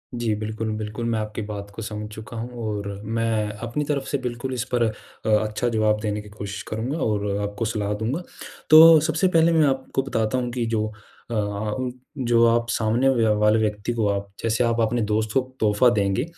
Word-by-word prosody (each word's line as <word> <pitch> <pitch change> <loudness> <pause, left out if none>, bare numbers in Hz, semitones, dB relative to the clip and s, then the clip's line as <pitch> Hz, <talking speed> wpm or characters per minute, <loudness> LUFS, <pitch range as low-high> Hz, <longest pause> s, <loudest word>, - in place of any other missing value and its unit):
जी। 120 -2 0
बिल्कुल, 110 +1 -3
बिल्कुल 110 +2 -4
मैं 115 -1 0
आपकी 110 +1 -4
बात 100 -1 -6
को 115 - -6
समझ 105 -1 -5
चुका 110 +2 -9
हूँ 115 +2 -4 0.2
और 105 -1 -3 0.2
मैं 110 -1 0 0.2
अपनी 150 +6 -2
तरफ 140 -2 -1
से 140 - 0
बिल्कुल 125 0 -4
इस 125 -2 -1
पर 120 - +3
अ, 110 0 -5
अच्छा 110 +2 +1
जवाब 110 -2 +2
देने 105 -1 -2
की 105 - -13
कोशिश 100 -1 -6
करूँगा 115 +8 -3
और 105 -2 0
अ, 100 - -2
आपको 100 +2 -3
सलाह 105 -2 -1
दूँगा। 115 +10 -2 0.5
तो 160 0 +10
सबसे 160 +3 +2
पहले 165 -2 +4
मैं 160 -2 +5
आपको 135 0 -1
बताता 115 -2 -1
हूँ 125 -1 -2
कि 120 -1 -2
जो 110 -1 0 0.5
अ - - -2
अ, 105 +4 -2 0.3
जो 120 -3 +3
आप 115 0 +2
सामने 115 +5 +2
वा 115 -4 +3
वाले 105 +1 +4
व्यक्ति 105 +1 -1
को 115 -3 0
आप 100 0 -2
जैसे 115 +1 +1
आप 115 0 +1
अपने 115 +2 +1
दोस्त 110 +1 0
को - - +4 0.2
तोहफ़ा 110 +3 +4
देंगे, 100 +4 +1
110 Hz, 205 wpm, -23 LUFS, 105-120 Hz, 0.5 s, तो